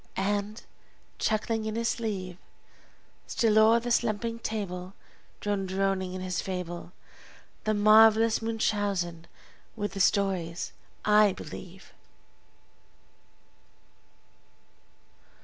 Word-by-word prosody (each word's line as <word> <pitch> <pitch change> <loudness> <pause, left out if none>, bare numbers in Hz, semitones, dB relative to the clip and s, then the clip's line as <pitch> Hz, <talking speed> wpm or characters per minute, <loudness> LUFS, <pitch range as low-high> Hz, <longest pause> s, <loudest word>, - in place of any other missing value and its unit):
and, 205 +3 -2 0.6
chuckling 220 0 0
in 220 0 -3
his 230 0 0
sleeve, 190 -6 -4 0.9
Still 220 -2 +3
o'er 225 +2 +6
the 240 +1 -4
slumbering 230 0 0
table, 190 -4 -5 0.5
Drone 205 -2 -1
droning 190 -1 -1
on 185 - -5
his 180 -2 -2
fable, 180 -2 -5 0.7
The 215 0 +1
marvelous 220 +2 +6
Munchausen, 205 -7 -1 0.5
with 205 -2 -3
the 195 - -5
stories 185 -4 0 0.3
I 210 -1 +5
believe! 180 +4 -10
205 Hz, 90 wpm, -28 LUFS, 185-220 Hz, 0.9 s, o'er